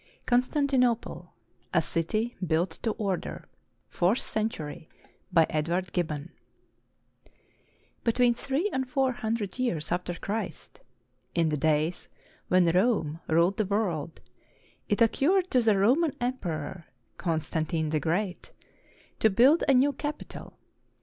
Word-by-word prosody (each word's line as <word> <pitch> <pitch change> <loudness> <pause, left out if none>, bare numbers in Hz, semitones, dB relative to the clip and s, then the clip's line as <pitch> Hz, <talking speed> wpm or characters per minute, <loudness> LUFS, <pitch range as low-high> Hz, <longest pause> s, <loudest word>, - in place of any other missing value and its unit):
CONSTANTINOPLE, 250 -1 +1 0.4
A - - +6
CITY 215 +8 -1
BUILT 165 0 0
TO 230 - 0
ORDER 195 -5 -3 0.4
[Fourth 180 +7 +1
century] 160 -9 -3 0.4
BY 165 -3 +5
EDWARD 170 +4 -1
GIBBON 160 -2 -2 1.7
[Between 240 +1 +3
three 275 - -1
and 260 -1 -1
four 270 -1 +2
hundred 225 -3 -3
years 170 -12 -1
after 175 0 -1
Christ, 200 -3 -5 0.6
in 165 -2 +2
the 150 - 0
days 155 +3 0 0.4
when 185 -1 +4
Rome 180 -5 +1
ruled 170 +4 +3
the 215 - +1
world, 180 -6 -2 0.7
it 205 +2 +4
occurred 355 - +2
to 250 - +4
the 220 -3 +3
Roman 270 - +3
Emperor, 180 - -3 0.3
Constantine 160 -1 -1
the 155 - +1
Great, 180 - -2 0.7
to 220 - +5
build 255 - +5
a 275 - +5
new 280 +3 +4
capital. 295 +3 -6
195 Hz, 115 wpm, -28 LUFS, 165-245 Hz, 1.7 s, A